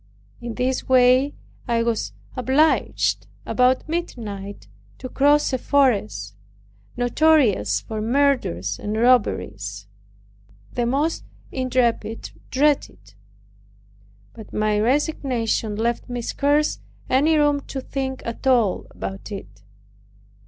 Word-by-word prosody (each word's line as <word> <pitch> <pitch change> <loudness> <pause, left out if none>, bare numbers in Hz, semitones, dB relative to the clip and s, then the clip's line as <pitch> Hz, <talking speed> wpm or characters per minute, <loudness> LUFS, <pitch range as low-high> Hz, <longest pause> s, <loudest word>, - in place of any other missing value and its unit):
In 235 -2 -5
this 255 +1 -1
way 255 +2 +4 0.3
I 230 -1 +1
was 230 -2 -1 0.2
obliged, 270 +5 +1 0.2
about 255 +2 +2
midnight, 205 - -5 0.3
to - - -7
cross 290 +1 +3
a 260 - 0
forest, 155 - +1 0.6
notorious 245 - +3
for 215 - -5
murders 225 - +1
and 210 +1 -3
robberies. 105 - +1 0.9
The 240 -1 0
most 290 +6 0 0.3
intrepid 240 -4 -1 0.2
dreaded 290 +2 +2
it; 100 0 -22 1.2
but 220 -2 -12
my 210 0 +1
resignation 245 -4 0
left 235 +3 -2
me 245 -1 -4
scarce 290 +5 +1 0.3
any 300 +5 +3
room 290 -1 +3
to 270 - -4
think 265 0 -4
at 230 +3 -5
all 235 -7 +2
about 195 +2 -7
it. 105 - -9
245 Hz, 105 wpm, -22 LUFS, 210-275 Hz, 1.2 s, way